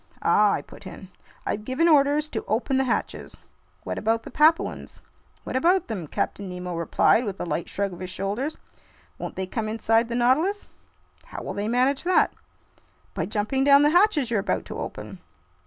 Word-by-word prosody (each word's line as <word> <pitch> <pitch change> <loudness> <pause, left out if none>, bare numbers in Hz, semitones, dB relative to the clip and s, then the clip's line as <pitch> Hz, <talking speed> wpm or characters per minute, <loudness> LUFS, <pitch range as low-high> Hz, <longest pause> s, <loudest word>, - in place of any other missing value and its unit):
"Ah!" 210 -1 +4
I - - -2
put 200 - -13
in. 185 +1 -10 0.4
"I've 210 - -2
given 260 +9 +1
orders 295 -1 +4
to - - -4
open 255 +4 0
the 265 - +2
hatches." 245 - -3 0.5
"What - - -4
about 225 +1 0
the - - -10
Papuans?" 315 +2 +1 0.4
"What - - -6
about 350 +7 +2
them?" 190 -8 -4
Captain 200 +6 -3
Nemo 180 -1 -5
replied, 170 +7 +3
with 200 -4 -5
a - - -3
light 170 0 -3
shrug 200 -1 -2
of 175 - -10
his 185 0 -6
shoulders. 200 +11 -3 0.6
"Won't - - -6
they 190 - -3
come 215 +3 -3
inside 225 +1 +1
the 235 - -2
Nautilus?" 305 +12 +1 0.6
"How - - -8
will - - -5
they 205 +1 -3
manage 255 +4 +2
that?" 365 +1 +3 0.8
"By - - -2
jumping 215 +6 -1
down 280 +1 +6
the 295 - +4
hatches 340 - +3
you're 220 - +2
about 195 - -2
to - - -7
open." - - -7
235 Hz, 185 wpm, -25 LUFS, 200-285 Hz, 0.8 s, down